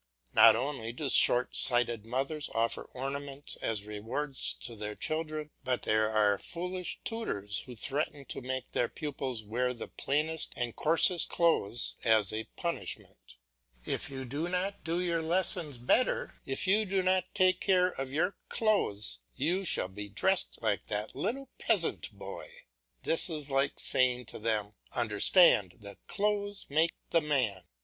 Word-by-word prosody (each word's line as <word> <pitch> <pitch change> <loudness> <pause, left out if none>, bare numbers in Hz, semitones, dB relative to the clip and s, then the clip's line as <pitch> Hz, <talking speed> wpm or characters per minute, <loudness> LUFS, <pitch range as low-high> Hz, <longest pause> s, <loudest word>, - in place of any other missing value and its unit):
Not 110 -1 +8
only 120 -2 -2
do 135 +4 -3
short 125 0 +5
sighted 120 -3 +2
mothers 135 +5 -2
offer 115 +1 0
ornaments 140 +2 -4
as 105 -2 -2
rewards 115 +7 -3
to 120 - -5
their 105 0 -5
children, 155 -1 -3
but 130 -1 -1
there 110 0 +2
are 105 -2 +2
foolish 180 +1 -5
tutors 105 - -2
who 125 - -8
threaten 140 +4 -2
to - - -6
make 130 0 -4
their 120 - 0
pupils 135 -6 -4
wear 125 +4 -1
the - - -7
plainest 155 +3 -1
and 120 -2 -2
coarsest 170 +3 +3
clothes 120 -10 +1
as 110 -4 +4
a 110 +1 -3
punishment. 170 - -5 0.5
"If - - -2
you 130 -1 -6
do 145 +7 -3
not 185 +2 -2
do 170 +1 -1
your 170 -2 0
lessons 170 -3 0
better, 255 - +1
if - - 0
you 210 +3 +3
do 190 0 +1
not 185 0 +1
take 185 -2 +4
more - - -29
care 185 -2 +4
of 135 -1 -5
your 170 +7 0
clothes, 105 - 0 0.2
you 170 +8 +1
shall 165 - +2
be 105 +2 -7
dressed 190 - 0
like 105 -3 0
that 105 +1 -2
little 270 +2 -3
peasant 170 - +1
boy." - - -9 0.5
This 165 - +1
is 150 -3 -4
like 135 +1 +1
saying 125 -1 +2
to - - -7
them, 105 -2 -1 0.2
"Understand 105 - +4
that 100 -1 -11
clothes 205 -1 -1
make 160 +3 +2 0.2
the 165 - +4
man." 125 - 0
140 Hz, 155 wpm, -31 LUFS, 115-175 Hz, 0.5 s, Not